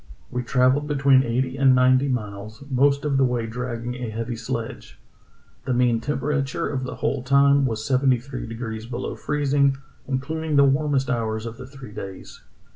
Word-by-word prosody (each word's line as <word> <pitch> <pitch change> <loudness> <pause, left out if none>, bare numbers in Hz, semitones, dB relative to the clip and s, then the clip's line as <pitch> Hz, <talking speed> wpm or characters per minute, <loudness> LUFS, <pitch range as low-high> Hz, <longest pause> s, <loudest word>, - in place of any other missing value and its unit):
We 125 - -2
travelled 130 +3 +2
between 140 -2 +4
eighty 130 +2 -1
and 135 -1 +5
ninety 130 +2 +4
miles, 110 -2 -4
most 140 +2 +2
of 140 -2 +1
the 135 - +4
way 125 -3 0
dragging 120 +1 -4
a 125 -2 -5
heavy 115 +2 -4
sledge. 115 0 -6 0.7
The 125 - 0
mean 120 -2 +2
temperature 140 +1 -1
of 130 -3 -3
the 130 - -5
whole 135 - -1
time 140 +1 +4
was 110 -2 -3
seventy 130 -1 +3
three 130 0 -7
degrees 115 -1 -6
below 120 +1 -4
freezing, 140 -2 +1 0.3
including 155 +4 -2
the 140 - +7
warmest 140 -1 +1
hours 110 -2 -2
of 115 0 -6
the 130 -1 -9
three 135 -4 -11
days. 95 -3 -9
130 Hz, 170 wpm, -23 LUFS, 120-140 Hz, 0.7 s, the